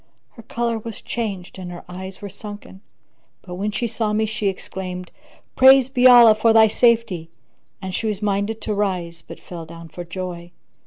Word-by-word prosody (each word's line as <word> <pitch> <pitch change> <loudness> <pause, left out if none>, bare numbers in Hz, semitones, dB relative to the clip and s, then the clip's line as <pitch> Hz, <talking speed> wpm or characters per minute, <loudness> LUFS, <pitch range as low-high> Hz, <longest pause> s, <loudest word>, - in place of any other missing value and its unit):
Her 230 - -13
colour 230 0 -2
was 225 0 -8
changed 195 -6 -5
and 180 -1 -7
her 175 - -9
eyes 190 +2 -9
were - - -4
sunken; 205 -1 -10 0.6
but, 180 - -9
when 200 +4 -2
she 215 +3 -2
saw 225 -2 -2
me, 220 +1 +1
she 215 -1 -3
exclaimed, 185 -1 -5 0.4
"Praised 265 0 +6
be 255 -1 +5
Allah 240 -3 +9
for 220 +1 +3
thy 225 0 +7
safety!" 225 -8 +1 0.5
And 190 -1 -5
she 220 - -2
was 210 -3 -2
minded 205 +1 -1
to 215 - -2
rise 180 -5 -2
but - - -12
fell 170 -2 -9
down 165 0 -11
for 175 +3 -8
joy. 175 0 -7
205 Hz, 180 wpm, -21 LUFS, 180-225 Hz, 0.6 s, Allah